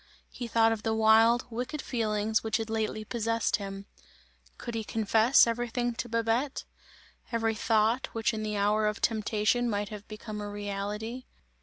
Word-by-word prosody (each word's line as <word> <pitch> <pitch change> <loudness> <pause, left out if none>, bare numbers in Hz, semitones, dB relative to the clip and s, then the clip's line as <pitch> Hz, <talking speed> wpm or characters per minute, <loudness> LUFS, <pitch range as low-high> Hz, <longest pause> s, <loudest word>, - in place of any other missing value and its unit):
He 245 - -6
thought 225 0 +3
of 225 -2 -2
the 220 0 0
wild, 225 +2 +5
wicked 250 +6 -4
feelings 220 -3 0
which 220 -1 0
had 225 -1 -4
lately 215 -1 -2
possessed 230 0 0
him. 195 -1 -7 0.7
Could 235 - -6
he 225 -1 -2
confess 220 +3 +4
everything 240 +1 -1
to 240 +1 -5
Babette? 230 +4 0 0.7
Every 225 -1 +1
thought, 225 +2 +1
which 225 0 0
in 220 - -3
the 210 -1 -2
hour 210 +1 +2
of 210 - -2
temptation 220 +2 +1
might 205 -2 -2
have 210 -1 -9
become 215 0 -7
a 205 - -5
reality? 205 +4 -4
220 Hz, 160 wpm, -29 LUFS, 210-230 Hz, 0.7 s, wild